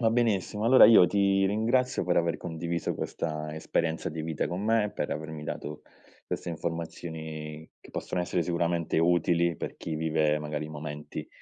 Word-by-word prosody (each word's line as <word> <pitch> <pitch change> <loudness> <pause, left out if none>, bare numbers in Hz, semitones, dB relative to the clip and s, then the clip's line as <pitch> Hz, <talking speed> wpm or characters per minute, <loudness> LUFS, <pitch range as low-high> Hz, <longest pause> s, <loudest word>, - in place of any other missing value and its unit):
Va 115 - +4
benissimo, 110 -3 +1
allora 130 +3 +8
io 110 -6 +8
ti 100 -1 +3
ringrazio 120 +5 +1
per 90 - +1
aver 85 0 +2
condiviso 85 0 -3
questa 75 -1 -4
esperienza 80 +1 -1
di 80 0 -5
vita 80 -1 -2
con 90 +3 -3
me, 110 -1 +2
per - - -3
avermi 80 0 -5
dato 75 0 -5 0.4
queste - - -4
informazioni 80 -2 -5
che - - -15
possono 90 - -3
essere 90 0 0
sicuramente 85 -1 0
utili 85 0 +3
per - - -5
chi 80 - -5
vive, 75 -1 +1
magari, 75 0 -4
momenti 75 -1 -6
85 Hz, 160 wpm, -28 LUFS, 80-95 Hz, 0.4 s, allora